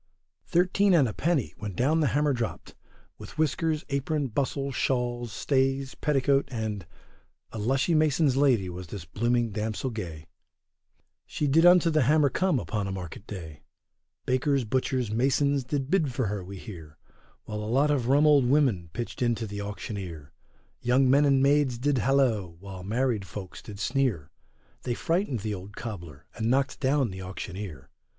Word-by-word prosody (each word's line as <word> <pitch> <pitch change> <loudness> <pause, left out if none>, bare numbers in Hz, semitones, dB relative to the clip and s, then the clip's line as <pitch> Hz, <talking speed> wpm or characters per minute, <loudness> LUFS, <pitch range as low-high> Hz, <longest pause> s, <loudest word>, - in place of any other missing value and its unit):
Thirteen 185 +2 +3
and 145 -6 +5
a 105 - -4
penny, 160 -5 0
when 105 -4 -5
down 150 - +2
the 150 - +3
hammer 145 +2 +2
dropt, 120 -3 -4 0.5
With - - -11
whiskers, 155 0 0
apron, 140 0 -1
bustle, 140 +3 -1
shawl, 120 -2 -1
stays, 135 +4 0
petticoat, 140 -2 +1
and 110 -7 -4 0.6
A 110 - -6
lushy 135 +9 +1
mason's 155 -3 +3
lady 130 -9 +3
was 90 0 -7
this 85 0 -7
blooming 120 +5 0
damsel 110 +5 -3
gay, 85 -8 -6 1.0
She 150 - -2
did 160 +5 +5
unto 175 -2 +6
the 155 -1 +3
hammer 145 +2 +4
come 185 -5 +1
upon 100 +1 -3
a - - -3
market 95 +2 -7
day; 80 -7 -8 0.6
Bakers, 130 +1 +1
butchers, 125 0 -1
masons, 135 +4 +2
did 135 0 -2
bid 165 -8 +2
for 125 0 -1
her, 105 -2 -3
we 95 +2 -8
hear, 80 -7 -10 0.5
While 105 0 -5
a 105 0 -4
lot 140 +5 +3
of 130 -5 0
rum 140 +3 +4
old 145 -4 +5
women 125 - +2
pitched 120 +1 -5
into 120 -2 +1
the 100 -1 -5
auctioneer. 95 -6 -6 0.5
Young 130 +2 +3
men 145 +2 +5
and 135 -1 +4
maids 140 -3 +3
did 135 +1 +1
halloa, 125 -6 +2
while 95 +3 -10
married 110 -1 -1
folks 95 -2 -8
did 100 -2 -10
sneer, 110 - 0 0.5
They 120 - -2
frightened 165 - -1
the 105 0 -2
old 100 +1 -8
cobler 85 - -7
and 110 0 -2
knocked 135 +2 +1
down 135 -4 +1
the 95 0 -7
auctioneer. 90 -5 -7
125 Hz, 165 wpm, -27 LUFS, 100-140 Hz, 1.0 s, unto